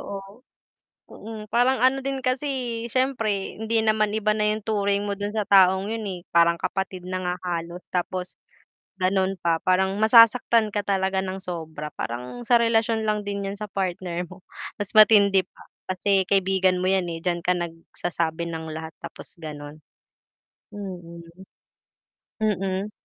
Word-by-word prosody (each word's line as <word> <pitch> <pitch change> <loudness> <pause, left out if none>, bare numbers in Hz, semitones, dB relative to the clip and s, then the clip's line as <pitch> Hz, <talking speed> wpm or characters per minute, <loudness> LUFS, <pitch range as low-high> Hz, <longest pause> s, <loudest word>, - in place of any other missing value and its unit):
oo, 200 +3 -8 0.7
mm, 215 -1 -9
parang 250 +2 +3
ano 270 +1 +4
din 270 -1 -2
kasi, 255 +3 0 0.4
siyempre 225 -6 -1
hindi 225 0 +1
naman 215 -1 +2
iba 215 0 +2
na 210 0 +1
yung 215 -1 -5
turing 200 -2 0
mo 200 - -2
dun 205 +1 -3
sa 215 - 0
taong 190 0 +5
yun 225 -1 -4
eh, 180 -2 -5
parang 170 0 +5
kapatid 190 -1 -3
na 185 - -2
nga 180 0 -1
halos 170 0 -4
tapos, 180 0 -3 0.6
gano'n 190 0 +1
pa 165 -1 +1
parang 190 +1 +2
masasaktan 230 0 +6
ka 205 - 0
talaga 190 -1 +1
ng 190 0 -4
sobra 160 -4 -6
parang 125 - -5
sa 240 0 +5
relasyon 225 -1 +2
lang 210 -1 0
din 200 -1 -3
yan 200 - -5
sa 210 -1 -6
partner 180 -2 -3
mo, 185 0 -13 0.4
mas 205 - -7
matindi 200 -3 +6
pa, - - -18 0.3
kasi 195 +1 +2
kaibigan 190 -1 +2
mo 185 - +2
yan 190 -2 +2
eh, 165 -1 -5
diyan 175 -1 0
ka 180 - +3
nagsasabi 170 0 -3
ng 160 -1 -5
lahat 160 0 -7
tapos - - -8
gano'n. 150 -1 -8 0.9
Mm. 175 -4 -8 1.2
Mm. 195 -1 -1
195 Hz, 155 wpm, -24 LUFS, 175-215 Hz, 1.2 s, masasaktan